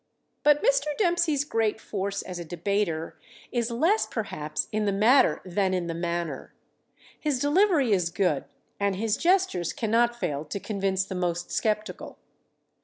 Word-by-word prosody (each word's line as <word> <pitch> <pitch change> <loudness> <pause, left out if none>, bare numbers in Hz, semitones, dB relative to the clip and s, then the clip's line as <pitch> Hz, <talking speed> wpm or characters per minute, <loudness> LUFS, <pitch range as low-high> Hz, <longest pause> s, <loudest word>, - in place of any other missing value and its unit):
But 295 0 +4
Mr. - - +2
Dempsey's 340 -7 +2
great 225 -6 0
force 200 -2 -3
as 180 -2 -6
a - - -4
debater 170 -1 -2 0.3
is 240 -1 0
less, 330 - +2
perhaps, 155 -9 -3
in 215 0 0
the 200 - +2
matter 230 +7 +4
than 185 +1 0
in 180 -1 -1
the 170 - -3
manner. 170 -3 -4 0.6
His 295 -4 0
delivery 290 - +3
is 180 -4 +2
good 175 -5 0 0.3
and 200 -1 +1
his 215 +2 0
gestures 350 - +1
cannot 235 +1 +1
fail 145 -6 -2
to 180 +7 -5
convince 195 -2 -1
the 195 - -6
most 175 -1 -2
skeptical. 215 0 -2
210 Hz, 150 wpm, -26 LUFS, 180-265 Hz, 0.6 s, But